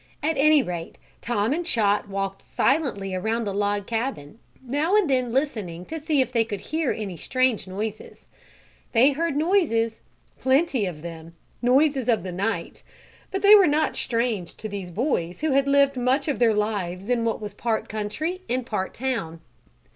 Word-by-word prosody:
At 315 +2 +1
any 295 0 +5
rate 170 -4 -6 0.2
Tom 230 +1 0
and 345 +3 -1
Chot 210 -10 +1
walked 195 0 -3
silently 255 -10 0
around 220 +5 -1
the 200 -2 -3
log 205 0 0
cabin, 225 - -4 0.3
now 295 +9 +1
and 420 -5 +4
then 255 -3 +1
listening 215 - -2
to 320 +8 -5
see 300 -2 +1
if 255 - -1
they 230 -2 +3
could 205 -3 -5
hear 315 +2 -1
any 200 -6 -5
strange 255 - 0
noises. 210 +3 -6 0.7
They 255 +4 +6
heard 320 +1 -1
noises 295 - +1 0.4
plenty 265 - +2
of 160 -4 -7
them 165 0 -9 0.3
noises 265 0 +3
of 225 -7 +2
the 185 - -5
night, 200 +5 -3 0.5
but 385 - -3
they 405 +1 +9
were 400 -3 +8
not 305 +1 +1
strange 230 -7 -1
to 215 - -6
these 200 -3 -6
boys 180 - -2
who 310 -1 +1
had 275 +1 +3
lived 280 0 +4
much 255 +4 +1
of 290 - -1
their 230 -3 +4
lives 200 -3 -2
in 240 -1 +1
what 230 -1 -1
was 210 -2 -6
part 220 +1 -2
country 260 - -3
and 250 0 -1
part 190 -4 -3
town. 225 -11 -3
230 Hz, 175 wpm, -24 LUFS, 200-280 Hz, 0.7 s, they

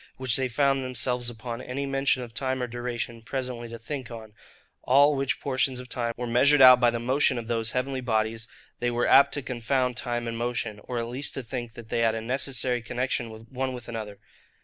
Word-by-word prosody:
which 130 -3 +2
they 130 -1 +2
found 135 +2 +2
themselves 125 -1 -1
upon 120 +1 -6
any 135 +3 -4
mention 135 -1 +1
of 115 -2 -10
time 130 +1 -1
or - - +1
duration 120 -1 -4
presently 125 -1 -4
to 115 - -7
think 130 +2 -6
on, 110 -3 -9 0.5
all 140 +3 +5
which 135 -1 0
portions 130 -1 0
of 125 - -8
time 120 -1 -2
were 125 - -3
measured 135 +5 +4
out 130 -1 +9
by 120 -1 +5
the 120 - -2
motion 130 +2 +2
of 115 - -4
those 115 -1 -2
heavenly 130 +1 -1
bodies, 110 -1 -1 0.3
they 120 - 0
were 120 0 0
apt 140 0 +6
to 145 0 -2
confound 125 0 -1
time 120 -1 -2
and 115 0 -4
motion; 120 -3 -2
or 125 - -4
at 115 - -1
least 130 +4 -1
to 135 - -4
think 120 -1 -5
that 115 -2 -11
they 115 - 0
had 115 -1 +2
a 115 - -3
necessary 125 0 -1
connexion 115 -2 -3
one 130 0 -2
with 120 -2 -8
another. 110 -3 -6
125 Hz, 215 wpm, -26 LUFS, 115-130 Hz, 0.5 s, out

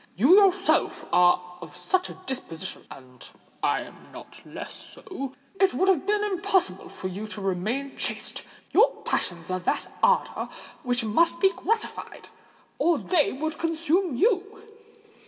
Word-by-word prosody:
"You 260 - +5
yourself 390 0 +2
are 180 0 +3
of 175 - -10
such 365 - 0
a - - -9
disposition—and 140 - -7 0.3
I - - +1
am - - -12
not - - -12
less - - -8
so. 275 -8 -8 0.2
It 385 -9 +3
would 375 +9 +2
have 375 -1 +2
been 420 0 +2
impossible 380 - 0
for 185 - -6
you 195 +4 -6
to 210 - -6
remain 210 +9 -2
chaste: - - 0 0.3
your 450 +5 +5
passions 170 0 -2
are 185 - 0
of 180 - -10
that - - -1
ardour - - +2 0.3
which 245 -1 0
must 330 +11 +2
be 385 -1 +5
gratified—or 370 -4 -3
they 325 0 +1
would 310 +3 -4
consume 330 0 0
you." 415 - +1
290 Hz, 140 wpm, -26 LUFS, -, 0.3 s, You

